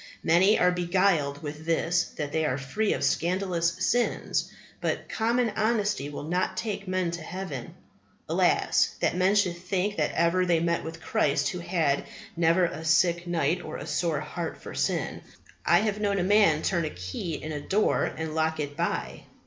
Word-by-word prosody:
Many 185 +6 +5
are 180 0 +4
beguiled 175 -5 +1
with 150 +1 -6
this 170 +1 +2
that 145 -2 -3
they 160 +1 0
are 135 -4 0
free 140 +11 -1
of - - -3
scandalous 175 -1 +1
sins. 245 -1 0 0.3
But - - -2
common 235 +1 +1
honesty 210 -9 0
will 145 - -6
not 180 +4 -1
take 205 -2 -3
men 185 -2 0
to 170 0 -5
heaven. 165 -7 -6 0.5
Alas! - - +2
that - - +1
men 185 +3 +3
should 185 -4 +2
think 185 +3 -2
that - - +1
ever 170 +2 +3
they 175 -2 +2
met 170 0 0
with 165 0 -8
Christ 140 - +1
who 180 - -4
had 170 -5 0 0.3
never 170 +2 +3
a 160 -1 -5
sick 170 +2 +2
night 170 0 0
or 155 - -6
a - - -7
sore 155 0 -1
heart 165 +2 -5
for - - -9
sin. - - -1 0.5
I - - +5
have 210 -1 -1
known 200 -1 +1
a 180 - +1
man 195 -5 +4
turn 175 -3 +1
a - - -2
key 95 - -5
in 155 +1 -6
a 145 -1 -4
door 205 +7 +1
and 160 0 -4
lock 160 0 0
it 145 -1 -3
by." - - -3
170 Hz, 180 wpm, -27 LUFS, 155-190 Hz, 0.5 s, Many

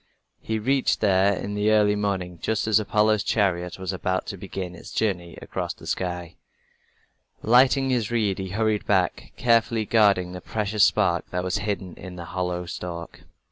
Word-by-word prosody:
He 110 - -2
reached 130 +5 +1
there 100 -1 +3
in 100 +2 -5
the 105 +1 +1
early 105 -1 +4
morning, 95 -4 -2
just 110 -2 0
as 110 -1 +4
Apollo's 110 0 +2
chariot 90 -6 0
was 95 0 -4
about 95 0 -1
to 100 - -5
begin 95 -1 -6
its 85 - -11
journey 90 -6 -2
across - - -4
the - - -14
sky. 90 -2 -3 1.1
Lighting 130 +3 +4
his 120 -5 0
reed, 110 -5 0
he 95 -1 -4
hurried 110 +2 0
back, 95 -3 0
carefully 115 -2 +2
guarding 100 -5 +3
the 90 0 -7
precious 105 -1 0
spark 90 -6 +1
that 90 0 -2
was 95 +2 -1
hidden 100 -3 -3
in 90 -1 -9
the 85 -1 -7
hollow 90 0 -3
stalk. 85 -1 -7
100 Hz, 170 wpm, -25 LUFS, 90-110 Hz, 1.1 s, early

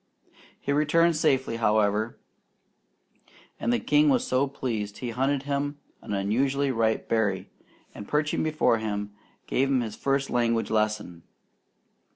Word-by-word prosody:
He - - -3
returned 165 +3 +3
safely, 135 -6 +1
however; 110 0 +1 1.4
and - - 0
the 240 - +2
king 295 0 +3
was 255 -2 +2
so 130 +2 +1
pleased 110 -7 -4
he 120 -2 -4
hunted 135 +3 0
him 145 +1 -2 0.2
an - - -8
unusually 135 +8 +1
ripe 115 -2 0
berry, 100 -4 0 0.4
and 105 - -9
perching 150 0 0
before 155 -7 +2
him, 105 -1 -3 0.3
gave 135 +1 +1
him 135 -2 +2
his 110 -3 -5
first 135 0 -1
language 115 -2 +1
lesson. 105 -5 -1
125 Hz, 135 wpm, -26 LUFS, 110-140 Hz, 1.4 s, returned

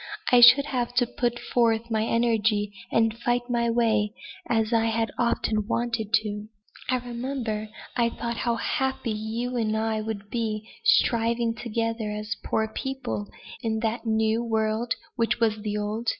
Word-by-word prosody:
I 245 -1 +7
should 250 +4 +9
have 245 -3 -2
to 245 0 +4
put 240 0 -1
forth 230 -1 +1
my 220 -1 +1
energies 225 -3 +1 0.2
and 225 0 +2
fight 240 +1 -1
my 235 -1 +1
way, 220 -2 +1 0.3
as 225 0 +1
I 225 -1 +3
had 225 0 0
often 220 -3 +1
wanted 230 -3 -1
to - - +4
do. 210 0 -5 0.4
I 255 - +3
remember, 240 -3 -4 0.3
I 235 -1 +3
thought 235 0 -4
how 235 -1 0
happy 265 0 -1
you 225 +4 -3
and 220 -2 0
I 220 0 0
would 210 -2 -6
be, 220 -2 -2 0.2
striving 235 - +3
together 230 -1 -2
as 210 0 -3
poor 220 0 0
people 220 - -4 0.3
'in 225 -2 -1
that 230 +1 -2
new 220 +1 +2
world 220 +1 0 0.2
which 230 0 +1
is 215 -2 +1
the 210 0 -2
old.' 215 +3 -2
225 Hz, 160 wpm, -26 LUFS, 220-240 Hz, 0.4 s, should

